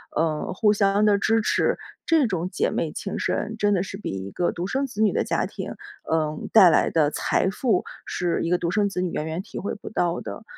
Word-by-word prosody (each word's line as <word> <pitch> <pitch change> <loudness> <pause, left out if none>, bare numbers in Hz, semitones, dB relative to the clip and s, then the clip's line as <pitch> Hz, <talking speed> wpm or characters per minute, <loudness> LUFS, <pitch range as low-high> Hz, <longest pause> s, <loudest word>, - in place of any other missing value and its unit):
呃， 155 -1 0
互 210 +3 +3
相 200 0 +2
地 205 -1 +4
支 225 +3 +2
持。 - - +1 0.3
这 320 -6 +4
种 180 -4 -2
姐 465 - 0
妹 - - -2
情 - - -5
深 225 - -2
真 205 -1 +2
的 185 - +2
是 195 +1 -5
比 210 - -5
1 95 0 -5
个 175 - -1
独 175 +2 -4
生 270 +6 0
子 225 -5 -5
女 215 -2 +4
的 - - 0
家 - - -1
庭， - - -6 0.3
呃， 155 -1 0 0.2
带 195 -5 +9
来 - - +3
的 155 -3 +3
财 185 - 0
富 210 -1 +1 0.2
是 175 -2 -1
1 165 - -1
个 180 - +3
独 170 - -1
生 205 +3 +2
子 195 -2 -3
女 180 - 0
远 155 - -3
远 160 +3 -3
体 - - -10
会 200 - -3
不 - - -8
到 175 -5 0
的。 - - -7
190 Hz, 245 characters per minute, -24 LUFS, 170-210 Hz, 0.3 s, 带